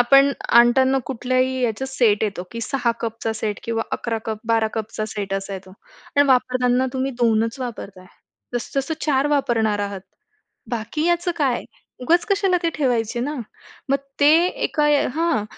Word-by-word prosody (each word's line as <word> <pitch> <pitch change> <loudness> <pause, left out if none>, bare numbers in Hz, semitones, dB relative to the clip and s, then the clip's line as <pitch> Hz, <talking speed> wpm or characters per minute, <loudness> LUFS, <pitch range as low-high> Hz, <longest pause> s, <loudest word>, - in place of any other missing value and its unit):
आपण 275 +3 +6 0.3
आणताना 260 +3 +5
कुठल्याही 255 +1 0
याचा 240 +2 -1
सेट 235 -6 +2
येतो, 200 -4 -3
की 230 - -5
6 245 0 0
कपचा 225 -1 -3
सेट 215 -1 -3
किंवा 225 -1 -1
11-12 225 0 -1
कपचा 215 -1 -3
सेट 200 -2 -4
असा 195 0 -4
येतो. 190 0 -9 0.5
आणि 285 0 +5
वापरताना 255 0 +2
तुम्ही 265 0 -1
2च 225 +1 +2
वापरताय, 200 -7 -7 0.5
जास्तीत 245 +3 -2
जास्त 295 - -4
4 275 -2 +2
वापरणार 230 -7 +1
आहात, 200 -1 -4 0.7
बाकी 240 +6 -2
याचं 345 0 +1
काय? 265 -6 0 0.4
उगाच 340 +7 +3
कशाला 390 -2 +2
ते 335 - +1
ठेवायचे 240 -5 0
ना. 290 +5 -2 0.5
मग 275 - +3 0.2
ते 285 +1 +7 0.2
एका 305 -4 -1 0.3
हां, 320 -10 +1
245 Hz, 145 wpm, -22 LUFS, 220-275 Hz, 0.7 s, ते